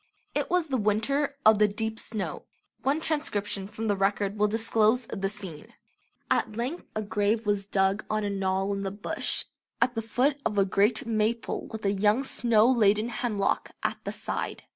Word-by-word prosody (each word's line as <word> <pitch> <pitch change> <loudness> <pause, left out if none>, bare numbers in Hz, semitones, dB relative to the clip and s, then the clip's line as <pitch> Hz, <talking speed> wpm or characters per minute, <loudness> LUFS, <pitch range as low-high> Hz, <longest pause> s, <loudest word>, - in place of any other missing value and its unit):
It - - -1
was 360 -2 +2
"the 275 -4 -1
winter 250 +7 +1
of 215 -1 +7
the 210 - +6
deep 220 +2 -3
snow". 215 -4 -4 0.4
One 285 +4 +1
transcription 205 -11 -1
from 215 +2 -6
the 205 - +2
record 200 +1 0
will 210 0 +3
disclose 225 +2 +2
the 195 -3 -2
scene: 180 -7 -8 0.6
At 215 0 +1
length 260 +9 -3
a 215 - -1
grave 215 +1 0
was 205 -1 0
dug 195 +1 +1
on 215 0 0
a 205 - -1
knoll 195 0 0
in 195 - -3
the 195 - -2
bush 205 +2 -1 0.3
at 250 - +2
the 225 - -2
foot 255 +6 +1
of 210 -2 -1
a 195 - +5
great 205 +7 +2
maple 225 +1 -1
with 220 -2 -7
a 195 - +3
young 210 +6 +2
snow 230 -4 +3
laden 220 -3 +3
hemlock 215 -4 -1
at - - -2
the - - -3
side. - - -4
215 Hz, 185 wpm, -27 LUFS, 200-230 Hz, 0.6 s, of